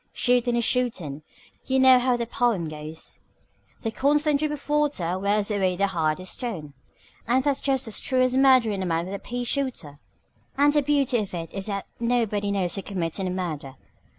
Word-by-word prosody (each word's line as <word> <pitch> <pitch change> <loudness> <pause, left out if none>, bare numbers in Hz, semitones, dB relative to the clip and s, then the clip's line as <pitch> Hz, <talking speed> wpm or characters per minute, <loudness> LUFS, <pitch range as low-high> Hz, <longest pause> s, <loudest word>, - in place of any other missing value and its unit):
Shootin' 245 -1 +2
is 235 - +1
shootin'. 195 - -1 0.5
You 265 - +2
know 260 -1 +7
how 250 0 +1
that 235 -1 -4
pome 225 -9 +1
goes 155 +1 -8 0.6
'The 225 - -2
constant 290 +3 +2
drip 305 0 -1
of 295 -2 -7
water 290 - 0
Wears 205 +2 +1
away 190 -3 +1
the 200 +2 +2
hardest 175 -1 -1
stone 175 - -5 0.3
' - - -29
and 255 +3 +2
that's 285 -2 0
just 270 -3 0
as 220 - -1
true 255 -1 +1
of 255 0 +1
murderin' 255 -7 +4
a - - -2
man 165 0 0
with 190 - -6
a 200 - -4
pea 245 +4 -4
shooter. 245 - -3 0.6
"And 290 +1 +4
the 295 - +3
beauty 275 -4 +1
of 200 -4 -4
it 165 -1 -6
is 195 +1 -4
that 200 -2 -3
nobody 225 -4 0
knows 190 -2 -1
you're 195 - -4
committin' 185 0 -3
a - - -1
murder. 160 -7 -4
220 Hz, 195 wpm, -25 LUFS, 185-260 Hz, 0.6 s, know